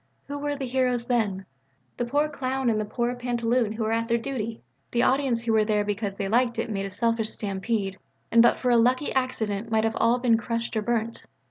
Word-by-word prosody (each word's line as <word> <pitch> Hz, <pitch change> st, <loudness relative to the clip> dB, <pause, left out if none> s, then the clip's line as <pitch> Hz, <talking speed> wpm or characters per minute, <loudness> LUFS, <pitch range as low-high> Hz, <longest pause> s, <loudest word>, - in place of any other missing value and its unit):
Who 285 Hz, 0 st, -5 dB
were 290 Hz, 0 st, -2 dB
the 275 Hz, -1 st, -4 dB
heroes 250 Hz, -1 st, 0 dB
then? 205 Hz, -6 st, 0 dB, 0.5 s
The 240 Hz, -, -1 dB
poor 290 Hz, +5 st, +1 dB
clown 265 Hz, -3 st, -1 dB
and 215 Hz, -1 st, 0 dB
the -, -, -3 dB
poor 240 Hz, +3 st, -1 dB
pantaloon 240 Hz, -2 st, 0 dB
who 220 Hz, 0 st, -3 dB
were 220 Hz, -, 0 dB
at 230 Hz, 0 st, 0 dB
their 235 Hz, 0 st, +2 dB
duty! 230 Hz, -3 st, -4 dB, 0.3 s
The 240 Hz, 0 st, +1 dB
audience 260 Hz, -3 st, +2 dB
who 230 Hz, -1 st, +1 dB
were 220 Hz, -1 st, +4 dB
there 210 Hz, -1 st, +1 dB
because 205 Hz, -1 st, -3 dB
they 200 Hz, -1 st, -3 dB
liked 235 Hz, +3 st, +2 dB
it 230 Hz, 0 st, -2 dB
made 195 Hz, -1 st, -2 dB
a -, -, -7 dB
selfish 230 Hz, +2 st, 0 dB
stampede, 200 Hz, -1 st, -1 dB, 0.3 s
and 230 Hz, -, +7 dB
but 235 Hz, -, +5 dB
for 250 Hz, -, 0 dB
a 240 Hz, -, +5 dB
lucky 250 Hz, +5 st, +2 dB
accident 230 Hz, -5 st, -1 dB
might 220 Hz, 0 st, +2 dB
all 230 Hz, +1 st, +2 dB
have 245 Hz, 0 st, -2 dB
been 230 Hz, -2 st, +4 dB
crushed 230 Hz, 0 st, -3 dB
or 220 Hz, -, +1 dB
burnt. 230 Hz, 0 st, -2 dB
230 Hz, 225 wpm, -26 LUFS, 220-250 Hz, 0.5 s, and